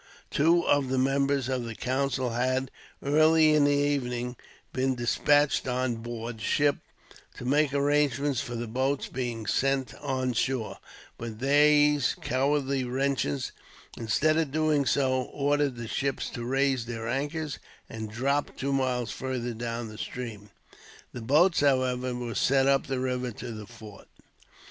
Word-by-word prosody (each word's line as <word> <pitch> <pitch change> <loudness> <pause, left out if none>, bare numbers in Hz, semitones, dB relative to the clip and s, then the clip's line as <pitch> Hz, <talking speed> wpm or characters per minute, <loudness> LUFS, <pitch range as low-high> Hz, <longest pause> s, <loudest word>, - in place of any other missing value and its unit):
Two 165 +4 +3
of 145 -2 +2
the 130 - 0
members 135 0 +1
of 130 -2 -1
the 115 -1 -6
council 130 0 -1
had, 130 +2 0 0.3
early 155 +2 +5
in 150 -1 +4
the - - +4
evening, 130 -4 0 0.4
been 130 0 0
despatched 145 +4 +2
on 125 -1 -1
board 115 0 -6
ship 145 +6 +2 0.6
to 125 - -8
make 145 +2 +2
arrangements 145 -1 +1
for 120 - -6
the 120 +1 -3
boats 130 +5 -1
being 120 -3 -4
sent 135 +1 0
on 130 -3 -1
shore; 120 0 -1 0.4
but 115 -2 -6
these 145 +1 +4
cowardly 135 +1 0
wretches, 125 - -1 0.4
instead 155 +8 +1
of 160 -3 +1
doing 150 -1 +1
so, 130 -2 +2
ordered 145 -1 0
the 120 -1 -6
ships 135 +3 -2
to 120 - -6
raise 135 0 +1
their 115 -1 -5
anchors, 145 +4 -3 0.3
and 110 -1 -6
drop 135 +6 -1
two 140 +1 -1
miles 125 -3 0
farther 125 -2 -3
down 115 0 -4
the 110 0 -10
stream. 110 -5 -6 0.6
The 120 - -6
boats, 155 +10 +4
however, 130 -3 +1
were 120 -1 -4
sent 135 +4 +3
up 140 0 +2
the 135 -1 -2
river 125 -1 -1
to 120 +3 -7
the 105 -2 -8
fort. 110 -3 -13
130 Hz, 150 wpm, -28 LUFS, 120-140 Hz, 0.6 s, early